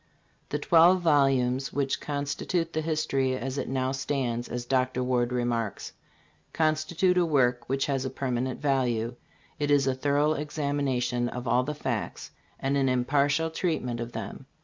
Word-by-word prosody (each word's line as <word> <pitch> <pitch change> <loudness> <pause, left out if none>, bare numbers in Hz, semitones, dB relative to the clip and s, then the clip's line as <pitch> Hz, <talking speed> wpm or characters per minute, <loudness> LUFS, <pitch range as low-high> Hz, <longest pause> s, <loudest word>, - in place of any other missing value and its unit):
"The 145 - -1
twelve 170 +4 +5
volumes 135 -4 +2
which 140 -1 -1
constitute 150 +4 -2
the 160 - 0
history 150 -5 0
as 135 +2 -3
it - - -3
now 130 0 0
stands," 130 -3 -2
as 120 0 -4
Dr. 130 0 +1
Ward 125 -1 +1
remarks, 120 -4 -2 0.3
" - - -37
constitute 160 +4 +2
a - - +4
work 125 -5 +1
which 135 0 +1
has 135 -2 -1
a 130 - -2
permanent 130 -1 -2
value. 125 -5 0 0.5
It 145 -1 0
is 145 -2 +4
a 135 - +2
thorough 145 +3 +1
examination 140 -5 -1
of 125 0 -6
all 125 +2 +3
the 150 +3 -4
facts 120 -6 -4 0.3
and 135 +1 0
an 135 -1 +2
impartial 140 +5 +1
treatment 155 -9 -2
of 120 0 -4
them. 110 +4 -7
135 Hz, 160 wpm, -27 LUFS, 125-145 Hz, 0.5 s, twelve